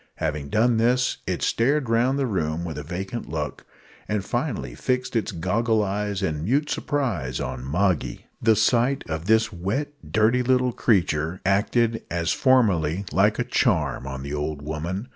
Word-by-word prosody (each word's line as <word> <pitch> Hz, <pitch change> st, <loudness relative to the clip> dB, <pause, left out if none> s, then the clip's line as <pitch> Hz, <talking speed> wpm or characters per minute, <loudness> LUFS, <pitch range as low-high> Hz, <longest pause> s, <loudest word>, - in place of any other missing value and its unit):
Having 75 Hz, -2 st, -3 dB
done 115 Hz, -, +3 dB
this, 125 Hz, +3 st, +2 dB
it -, -, -2 dB
stared 135 Hz, +3 st, +2 dB
round 120 Hz, +4 st, +2 dB
the 140 Hz, -, +1 dB
room 85 Hz, -6 st, -1 dB
with 80 Hz, -3 st, -5 dB
a -, -, -6 dB
vacant 95 Hz, -, -5 dB
look, 75 Hz, -2 st, -4 dB, 0.4 s
and 105 Hz, -2 st, -1 dB
finally -, -, -2 dB
fixed 125 Hz, -, -2 dB
its 115 Hz, -, 0 dB
goggle 105 Hz, +6 st, +1 dB
eyes 100 Hz, 0 st, -2 dB
in 75 Hz, -4 st, -1 dB
mute 140 Hz, -, +1 dB
surprise 105 Hz, -, -1 dB
on 60 Hz, -, -4 dB
Moggy. 90 Hz, +5 st, 0 dB, 0.2 s
The 110 Hz, -1 st, +4 dB
sight 120 Hz, +5 st, +2 dB
of 80 Hz, 0 st, -4 dB
this 110 Hz, 0 st, +3 dB
wet, 100 Hz, +12 st, -2 dB, 0.2 s
dirty 110 Hz, +4 st, +3 dB
little 125 Hz, 0 st, +2 dB
creature 85 Hz, -7 st, +1 dB
acted, 115 Hz, +4 st, +2 dB
as 85 Hz, -1 st, 0 dB
formerly, 100 Hz, -, +2 dB
like -, -, +3 dB
a -, -, +1 dB
charm 65 Hz, -, 0 dB
on 65 Hz, 0 st, -5 dB
the 70 Hz, +1 st, -5 dB
old 75 Hz, 0 st, -3 dB
woman. 85 Hz, -, -4 dB
100 Hz, 160 wpm, -24 LUFS, 80-120 Hz, 0.4 s, The